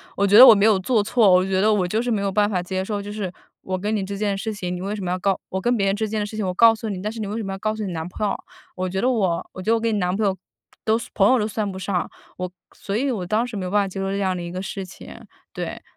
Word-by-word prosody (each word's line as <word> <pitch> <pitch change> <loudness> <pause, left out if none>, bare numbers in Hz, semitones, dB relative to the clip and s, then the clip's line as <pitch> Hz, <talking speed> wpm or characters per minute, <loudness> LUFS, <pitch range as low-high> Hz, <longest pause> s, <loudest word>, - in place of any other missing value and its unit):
我 200 - +2
觉 200 +2 +5
得 255 - +12
我 225 - +10
没 200 - +3
有 215 -3 +4
做 215 +1 +1
错。 220 -1 +3
我 180 0 +5
觉 190 -1 0
得 215 +2 +4
我 185 -3 +1
就 215 +5 0
是 245 - -2
没 215 -3 0
有 200 -1 -1
办 205 +1 +2
法 185 -3 0
接 185 +1 -2
受， 205 +1 -3
就 205 +1 -7
是 205 -4 -4 0.3
我 185 0 -3
跟 210 +4 -2
你 200 - -1
这 200 +1 -5
件 200 -1 -1
事 220 +2 -3
情， 180 -3 -4
你 180 - -5
为 200 +2 -3
什 200 - -6
么 175 - -2
要 185 - -1
告 195 0 +1
我 190 - -2
跟 240 +5 +1
别 195 -3 +1
人 195 - +2
之 220 +1 -1
间 215 +1 -2
的 205 - -1
事 210 +1 -8
情 210 - -1
我 185 - -1
告 230 +3 +6
诉 220 0 -5
你， 190 -3 -4
但 210 +2 -3
是 225 - -8
你 215 - -3
为 210 +3 -4
什 225 - -3
么 195 - -4
要 - - -5
告 215 +1 -1
诉 215 - -4
你 190 - -3
男 160 -1 -4
朋 200 +4 -3
友？ - - 0 0.4
我 185 0 -2
觉 190 +1 -2
得 255 - +2
我 190 -9 0
我 185 - -7
觉 220 - 0
得 - - +5
我 230 - 0
跟 230 -1 0
你 205 - 0
男 180 0 0
朋 215 +1 0
友 195 -1 +1 0.5
都 220 +1 +3
算 235 - -8
朋 195 +2 +4
友 260 - +5
都 210 - 0
算 215 -1 -2
不 190 - -6
上， 190 -1 -2 0.3
我 180 0 -3 0.2
所 200 - -5
以 265 +4 +1
我 195 -6 -3
当 215 +6 +1
时 235 -4 -6
没 185 - -3
有 180 - -4
办 205 0 +3
法 195 - -3
接 195 +1 -6
受 195 0 -2
这 200 - -2
样 190 -2 0
的 - - -5
一 170 - -6
个 185 +1 -4
事 195 0 -5
情。 180 - -12 0.3
对。 - - -6
200 Hz, 385 characters per minute, -22 LUFS, 185-215 Hz, 0.5 s, 得